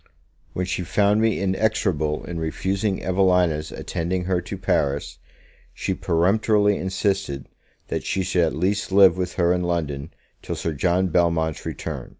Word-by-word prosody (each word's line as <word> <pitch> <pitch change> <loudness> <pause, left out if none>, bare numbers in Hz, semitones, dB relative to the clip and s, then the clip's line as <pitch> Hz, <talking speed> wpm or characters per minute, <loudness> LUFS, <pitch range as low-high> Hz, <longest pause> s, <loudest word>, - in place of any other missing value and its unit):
When 90 - -2
she 90 - -2
found 105 +4 +2
me 110 -2 +2
inexorable 95 -6 0
in 85 -1 -5
refusing 95 +5 -1
Evelina's 90 -4 +2
attending 90 +1 -3
her 90 -1 0
to 90 - -6
Paris, 70 0 -1 0.6
she - - -2
peremptorily 105 +4 +2
insisted 95 -6 -2 0.4
that - - -2
she 95 +1 -1
should 90 -1 +1
at 80 - -2
least 95 +5 -1
live 95 -3 +7
with 90 -1 -3
her 85 -1 +2
in 90 - 0
London 80 -4 -2 0.3
till - - -4
Sir 80 - -3
John 90 +5 +1
Belmont's 80 -2 +1
return. - - -5
90 Hz, 150 wpm, -23 LUFS, 80-95 Hz, 0.6 s, live